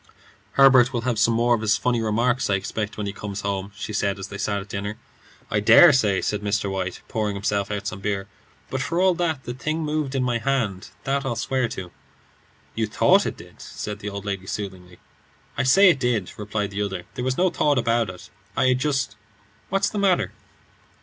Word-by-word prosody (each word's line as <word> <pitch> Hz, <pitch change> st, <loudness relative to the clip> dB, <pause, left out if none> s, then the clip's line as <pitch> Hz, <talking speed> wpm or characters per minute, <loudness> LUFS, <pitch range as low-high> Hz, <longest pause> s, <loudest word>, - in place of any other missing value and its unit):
"Herbert 135 Hz, -2 st, +6 dB
will 120 Hz, -3 st, -2 dB
have 120 Hz, -2 st, -1 dB
some 115 Hz, +1 st, +3 dB
more 120 Hz, +1 st, +3 dB
of 115 Hz, -, 0 dB
his 110 Hz, -1 st, +2 dB
funny 120 Hz, -2 st, 0 dB
remarks, 120 Hz, +4 st, +1 dB
I 100 Hz, -, +3 dB
expect, 105 Hz, +2 st, -4 dB
when 105 Hz, -, -3 dB
he 100 Hz, -, -3 dB
comes 105 Hz, -1 st, -6 dB
home," 100 Hz, 0 st, -3 dB
she 105 Hz, -, -6 dB
said, 100 Hz, -1 st, 0 dB
as 95 Hz, 0 st, -7 dB
they 100 Hz, -, -7 dB
sat 100 Hz, 0 st, -1 dB
at 100 Hz, -, -9 dB
dinner. 100 Hz, +1 st, -4 dB, 0.5 s
"I 105 Hz, -, +2 dB
dare 145 Hz, +9 st, +8 dB
say," 105 Hz, -7 st, +2 dB
said 105 Hz, -1 st, -1 dB
Mr. 100 Hz, -1 st, -1 dB
White, 95 Hz, -2 st, -3 dB
pouring 105 Hz, -2 st, -2 dB
himself 100 Hz, 0 st, -1 dB
out 105 Hz, 0 st, -3 dB
some 105 Hz, -1 st, -4 dB
beer; 100 Hz, -1 st, -2 dB, 0.4 s
"but 130 Hz, -, -1 dB
for 170 Hz, +5 st, -1 dB
all 185 Hz, 0 st, +4 dB
that, 165 Hz, -5 st, -1 dB
the 120 Hz, -, -5 dB
thing 155 Hz, +5 st, -2 dB
moved 150 Hz, -2 st, -2 dB
in 130 Hz, -, +1 dB
my 120 Hz, -2 st, 0 dB
hand; 115 Hz, -7 st, -1 dB
that 140 Hz, +1 st, 0 dB
I'll 135 Hz, -4 st, -2 dB
swear 130 Hz, +2 st, 0 dB
to." 90 Hz, -5 st, -7 dB, 0.8 s
"You 110 Hz, -1 st, -1 dB
thought -, -, +4 dB
it -, -, -4 dB
did," -, -, -14 dB
said 105 Hz, -1 st, -6 dB
the 105 Hz, -, -5 dB
old 100 Hz, 0 st, -7 dB
lady 100 Hz, -2 st, -4 dB
soothingly. 95 Hz, -4 st, -6 dB, 0.6 s
"I -, -, 0 dB
say 190 Hz, +11 st, +6 dB
it 145 Hz, -, -2 dB
did," 120 Hz, -7 st, 0 dB
replied 105 Hz, -1 st, -3 dB
the 100 Hz, +1 st, -3 dB
other. 95 Hz, -3 st, -3 dB
"There 125 Hz, -, -4 dB
was 130 Hz, 0 st, -1 dB
no 185 Hz, 0 st, +3 dB
thought 145 Hz, -2 st, +2 dB
about 115 Hz, -2 st, +1 dB
it; 90 Hz, -1 st, -11 dB, 0.3 s
I 130 Hz, -, +4 dB
had 130 Hz, 0 st, +2 dB
just 135 Hz, -7 st, -1 dB, 0.5 s
What's 195 Hz, +1 st, +1 dB
the 210 Hz, -, -2 dB
matter?" 190 Hz, -3 st, +2 dB
110 Hz, 215 wpm, -24 LUFS, 100-130 Hz, 0.8 s, dare